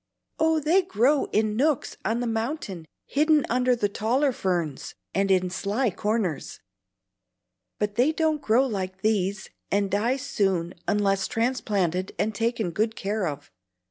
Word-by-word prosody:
"Oh, 320 0 +3
they 325 +6 +3
grow 280 - +2
in 215 0 0
nooks 285 +2 +1
on 230 +2 0
the - - -1
mountain 225 - -3 0.2
hidden 300 0 +3
under 250 +1 +3
the 210 -3 +1
taller 245 +8 +1
ferns, 175 - -2 0.2
and 195 +1 +1
in 185 -1 +2
sly 205 +6 0
corners. 205 -5 -2 1.2
But 210 -1 -1
they 255 +6 +4
don't 315 -2 0
grow 245 +2 +3
like 190 -5 -4
these, 200 -2 0 0.2
and 200 0 +1
die 230 +7 +1
soon 195 -10 -1
unless 195 -2 +1
transplanted 200 -7 -1
and 220 +1 0
taken 225 -3 -1
good 220 +5 0
care 200 -1 -1
of. 145 -1 -6
215 Hz, 140 wpm, -26 LUFS, 195-255 Hz, 1.2 s, they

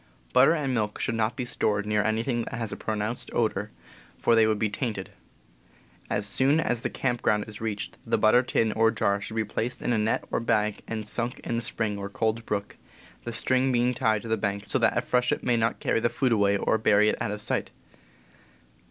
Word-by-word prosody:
Butter 135 +5 +6
and 145 -5 -1
milk 105 -3 -1
should - - -1
not 110 0 0
be 125 - -3
stored 105 -4 0
near 105 -1 +1
anything 115 +2 0
that - - -6
has 115 -3 -3
a - - -3
pronounced 110 +2 -3
odor, 105 -3 0 0.5
for 120 - +2
they 115 -1 +5
would 110 -1 +1
be 110 - +1
tainted. 105 -2 -4 1.0
As - - -1
soon 135 +9 +2
as 120 -7 0
the - - -2
camp 120 -3 -2
ground 105 -1 +1
is 105 0 -9
reached 105 -2 -4
the - - +1
butter 110 +3 +5
tin 115 -3 +1
or 110 +1 +3
jar 100 -2 0
should 110 - -7
be 110 -1 0
placed 125 +4 -3
in 120 - -1
a 110 - +2
net 110 +1 0
or - - +1
bag 105 -3 0
and 110 -2 -4
sunk 120 +3 -2
in 115 - -2
the - - -1
spring 110 -3 -2
or 100 0 -5
cold 110 +2 -1
brook, 100 0 -3 0.5
the 120 - -3
string 130 +3 +2
being 125 0 +2
tied 110 -4 +1
to - - -7
the 110 0 +1
bank 100 -1 -2
so - - 0
that - - +2
a - - +3
freshet 125 0 +1
may 125 - +2
not 115 0 0
carry - - +1
the 120 - +1
food 130 0 0
away 100 -2 +3
or 110 - +1
bury 105 -1 +4
it - - 0
out - - -1
of 105 0 -4
sight. 105 - -1
110 Hz, 225 wpm, -27 LUFS, 105-120 Hz, 1.0 s, Butter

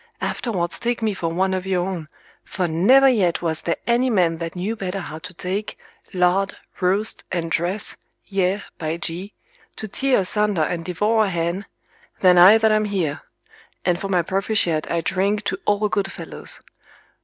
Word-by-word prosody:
Afterwards 180 -8 -2
take 235 -1 -1
me 215 -2 +1
for 170 -3 -2
one 190 +3 0
of 185 0 -3
your 185 -1 0
own, 175 -5 -4 0.4
for 180 -2 -2
never 205 +13 +5
yet 190 -10 +2
was 160 -2 -1
there 170 - -1
any 240 +2 +2
man 175 -7 +2
that 165 +1 -5
knew 195 +6 -2
better 195 -2 -4
how 155 -3 -7
to 185 +2 -8
take, 185 +4 -4 0.3
lard, 185 +2 +1 0.2
roast, 195 +4 0
and 165 -2 -2
dress, 180 +6 -1 0.3
yea, 195 0 0 0.2
by 160 0 -2
G, 175 +4 -5 0.4
to 215 - -4
tear 260 +2 +1
asunder 205 -2 +1
and 165 +2 -2
devour 210 +6 +1
a - - -1
hen, 170 +2 -2 0.5
than 180 -2 +6
I 190 +5 +9
that 220 -1 +3
am 215 0 +2
here: 180 -8 -2 0.6
and 175 0 +1
for 195 - -3
my 180 -3 +2
proficiat 190 -4 0
I 170 - 0
drink 200 +4 0
to - - -2
all 205 +1 +2
good 200 -2 -1
fellows. - - -8
190 Hz, 175 wpm, -22 LUFS, 175-210 Hz, 0.6 s, I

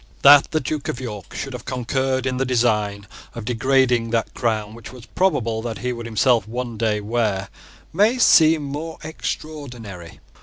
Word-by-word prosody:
That 140 0 +8
the 155 - 0
Duke 150 +1 -4
of 120 - -3
York 105 -7 -7
should 135 - -5
have 125 - -7
concurred 130 +1 -1
in 130 -1 -1
the 135 - +1
design 105 -5 0 0.3
of 115 -2 -6
degrading 125 0 +2
that 115 -1 -1
crown 110 -3 -1
which 115 -2 -11
it - - -11
was 125 -2 -12
probable 115 - 0
that 115 -1 -5
he 125 0 -3
would 120 -1 -7
himself 115 +1 +2
one 120 +1 -4
day 110 -1 0
wear 105 -3 -1 0.4
may 210 +8 +3
seem 160 -9 +5
more 150 +4 -5
extraordinary. 125 - -7
120 Hz, 175 wpm, -21 LUFS, 110-135 Hz, 0.4 s, That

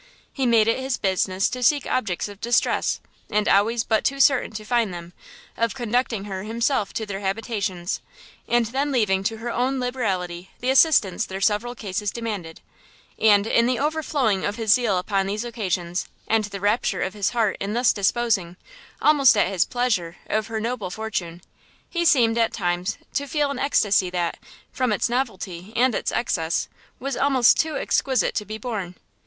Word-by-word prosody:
He 265 -3 0
made 225 -2 +4
it 230 - +2
his 260 -1 -2
business 190 0 +1
to 250 - -4
seek 285 +3 +3
objects 210 -9 -1
of 205 0 -12
distress, 235 +1 +1 0.3
and 210 0 +1
always 220 +4 +3
but 220 -1 +1
too 275 0 0
certain 270 -1 +4
to 215 0 -7
find 235 -3 +1
them, 175 0 -8 0.4
of 230 +1 -1
conducting 240 -3 -1
her 195 -2 -5
himself 225 0 -1
to 220 - -3
their 200 -2 -5
habitations, 195 -3 -3 0.5
and 240 -1 +2
then 270 +6 -1
leaving 200 -7 +1
to 225 +1 -1
her 235 +2 -4
own 260 +3 0
liberality 190 -8 -2
the 255 +1 0
assistance 265 - +4
their 190 0 -5
several 210 +4 0
cases 205 -1 -3
demanded: 205 -8 -5 0.6
and, 205 -2 +5
in 235 +1 +3
the 250 -1 +1
overflowing 285 -8 0
of 205 - -1
his 220 -2 +3
zeal 225 -6 +2
upon 195 +1 0
these 210 +4 -3
occasions, 185 -6 -2 0.2
and 220 -1 +2
the 200 -1 -7
rapture 205 +4 +1
of 190 - -3
his 205 -2 0
heart 225 -4 +1
in 200 +1 -3
thus 245 +1 +3
disposing, 200 -4 0 0.5
almost 280 -6 +6
at 195 - +3
his 190 -4 +1
pleasure, 210 -9 -1
of 215 0 -1
her 225 -1 -3
noble 225 -4 -3
fortune, 180 -4 -4 0.5
he 345 -1 0
seemed, 235 -7 +4
at 230 - +2
times, 175 -1 -2 0.2
to 285 - -1
feel 290 0 0
an 275 - -4
extasy 205 -9 +2
that, 175 -1 -2 0.3
from 255 -3 0
its 210 +3 +1
novelty 205 -7 -3
and 250 +1 +3
its - - -1
excess, 170 -7 -1 0.3
was 275 0 -3
almost 265 -4 +4
too 315 -1 0
exquisite 260 -8 +1
to 210 - -2
be 215 +1 -6
borne. 210 -6 -5
220 Hz, 180 wpm, -23 LUFS, 195-245 Hz, 0.6 s, almost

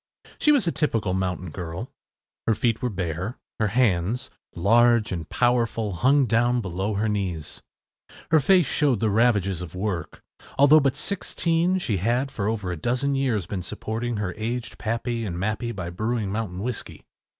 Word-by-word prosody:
She 300 - +5
was 280 -9 +3
a 170 - +1
typical 115 - 0
mountain 90 -2 -2
girl. 90 - -6 0.6
Her 110 - +3
feet 115 +1 0
were 125 - 0
bare. 90 - -3 0.2
Her 110 - +2
hands, 105 -1 +1 0.2
large 115 +4 +4
and 85 -4 -4
powerful, 115 -3 +1
hung 135 - +3
down 120 +2 +2
below 95 0 -2
her 105 +2 0
knees. 95 -7 -3 0.7
Her 160 - +6
face 180 +4 +4
showed 135 -3 +1
the 110 -1 +1
ravages 100 -5 +2
of 90 -1 -8
work. 90 -4 -4 0.3
Although 145 +3 +7
but 135 -3 +1
sixteen, 175 -2 0
she 115 - -1
had 120 +8 0
for 100 -5 -2
over 105 -5 -2
a 85 - -4
dozen 125 - 0
years 125 -8 0
been 95 +1 -4
supporting 110 +5 -4
her 100 -3 -2
aged 115 +2 -4
pappy 115 +1 -2
and 90 -5 -4
mappy 110 +5 -2
by 90 -6 -5
brewing 110 +2 -2
mountain 100 -3 -3
whiskey. 125 -1 -5
110 Hz, 165 wpm, -25 LUFS, 95-125 Hz, 0.7 s, Although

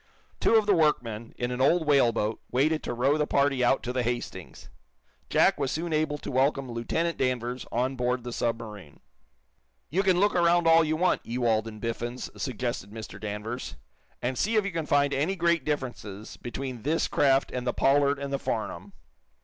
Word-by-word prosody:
Two - - +3
of 220 -1 +5
the 205 - +4
workmen, 120 - 0
in 120 0 -2
an 125 +1 -2
old 160 +5 +3
whaleboat, 120 -7 +2
waited 155 +5 +1
to - - -4
row 135 +5 +2
the 150 - +1
party 140 -2 +2
out 125 +2 +3
to 125 - -3
the 130 - 0
"Hastings." 120 0 -5 0.6
Jack - - +3
was 135 - 0
soon 165 +2 -2
able 155 -1 0
to - - -7
welcome 135 0 +1
Lieutenant 160 +9 -2
Danvers 125 -1 -1
on 130 +3 0
board 125 0 -1
the 120 -1 -5
submarine. 110 -9 -4 0.9
"You 185 +6 +2
can 185 -2 +3
look 205 +2 +3
around 175 0 +4
all 165 0 +7
you 155 0 0
want, 180 +3 +1
Ewald 115 -2 0
and 110 -1 -8
Biffens," 120 +2 -4
suggested 120 -5 -3
Mr. 105 -2 -9
Danvers, 110 +3 -5 0.5
"and 125 +1 -1
see 225 +3 +1
if 215 -2 +3
you 200 - -2
can 165 -3 -3
find 145 0 +3
any 155 +8 0
great 170 -3 +2
differences 120 -8 -4
between 125 0 -6
this 155 +6 0
craft 135 -1 +2
and 125 0 -4
the - - +3
'Pollard' 140 +1 +3
and 140 0 -5
the 140 - 0
'Farnum.'" 100 -5 -4
130 Hz, 185 wpm, -27 LUFS, 120-155 Hz, 0.9 s, all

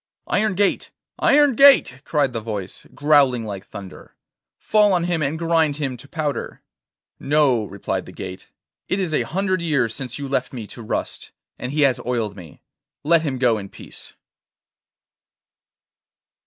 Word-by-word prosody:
'Iron 210 -2 +1
gate, 200 +1 +1 0.3
iron 290 -1 +5
gate,' 260 - +6
cried 145 -5 +1
the 115 - -3
voice, 105 -4 -6
growling 140 -5 +3
like 100 -2 -7
thunder, 95 -2 -11 0.4
'fall 210 -2 +3
on 175 -2 +1
him 175 -2 -1
and 145 +2 -1
grind 165 -3 +1
him 140 -3 -3
to 125 +3 -11
powder.' 150 -1 -4 0.6
'No,' 135 -6 +2
replied 100 0 -4
the - - -9
gate; 95 0 -8 0.4
'it 190 - 0
is 180 -5 -2
a - - +2
hundred 185 0 -1
years 140 -9 0
since 125 0 -6
you 140 - -5
left 130 -1 -2
me 120 -4 -6
to 120 - -11
rust, 110 - -4 0.3
and 125 - -4
he 150 +1 0
has 135 -3 +3
oiled 115 -5 -2
me. 85 -6 -13 0.4
Let 165 +2 +4
him 140 -5 -2
go 120 -4 +2
in 100 -1 -8
peace. - - -11
140 Hz, 155 wpm, -22 LUFS, 115-165 Hz, 0.6 s, gate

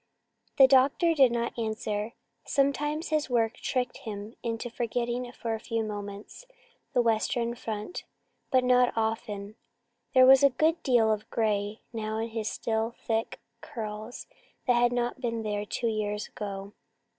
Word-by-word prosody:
The 270 - +10
doctor 275 +6 +4
did 270 -6 +5
not 235 0 -1
answer. 215 0 -2 0.3
Sometimes 295 +3 0
his 305 -2 0
work 235 -1 +1
tricked 250 -1 -2
him 210 0 -7
into 230 0 -3
forgetting 240 +1 -2
for 230 -2 -4
a 220 - -3
few 225 0 -2
moments 205 - -7 0.5
the 245 - +3
Western 230 +1 +1
front, 220 +4 -5 0.5
but 255 -1 +3
not 250 0 +4
often. 215 -2 -2 0.6
There 255 0 +8
was 265 +1 +8
a 280 - +7
good 315 +6 +1
deal 235 -5 +3
of 215 0 -2
grey 210 -1 -1
now 220 -1 -3
in 225 +1 -2
his 220 -1 -2
still 225 +1 -2
thick 225 0 -1 0.2
curls 215 +2 -6 0.4
that 250 - +4
had 240 0 +3
not 245 +1 -1
been 230 -2 -2
there 210 -1 -2
two 240 - -3
years 210 -1 -2
ago. 200 -1 -6
230 Hz, 150 wpm, -28 LUFS, 215-250 Hz, 0.6 s, The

